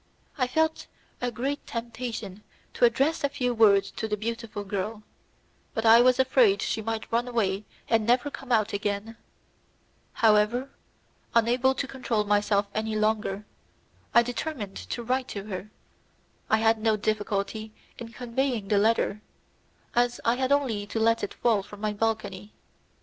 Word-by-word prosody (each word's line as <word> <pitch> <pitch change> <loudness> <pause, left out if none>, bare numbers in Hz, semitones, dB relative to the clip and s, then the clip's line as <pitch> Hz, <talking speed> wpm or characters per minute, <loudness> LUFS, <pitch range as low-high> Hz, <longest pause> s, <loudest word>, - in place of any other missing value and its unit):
I 255 -4 0
felt 315 +4 0 0.3
a 245 - 0
great 265 +5 -3
temptation 230 -4 -5 0.3
to - - +4
address 270 +8 +2
a 285 - +2
few 250 -3 -1
words 200 -3 +4
to 220 - -4
the 210 -1 -1
beautiful 230 -1 -4
girl, 205 +2 -4 0.7
but 225 - -1
I 225 +1 +8
was 255 0 +5
afraid 250 -6 +4
she 220 - -1
might 225 0 -4
run 235 +2 +1
away 210 -4 -1 0.2
and 225 -1 +2
never 250 +4 +2
come 270 -2 -8
out 220 -2 +2
again; 205 +2 -2 1.0
however, 225 +4 +3 0.6
unable 245 +3 +3
to 265 - -2
control 245 -5 -1
myself 205 0 +2
any 220 0 -2
longer, 215 -1 0 0.7
I 235 - +6
determined 240 -4 -4
to 240 - -5
write 255 +2 0
to 200 - -5
her; 205 0 -6 0.8
I 220 - +4
had 225 0 +3
no 215 -1 +2
difficulty 215 +1 -2 0.3
in 235 -1 -7
conveying 245 -3 -2
the 205 -2 +4
letter, 215 -1 +1 0.7
as 245 0 +2
I 230 - +4
had 260 +2 -1
only 240 -8 +1
to 225 - -3
let 230 0 +2
it 205 - -4
fall 225 -4 +2
from 205 +1 -12
my 210 0 -1
balcony. 210 -2 -2
225 Hz, 155 wpm, -27 LUFS, 210-245 Hz, 1.0 s, I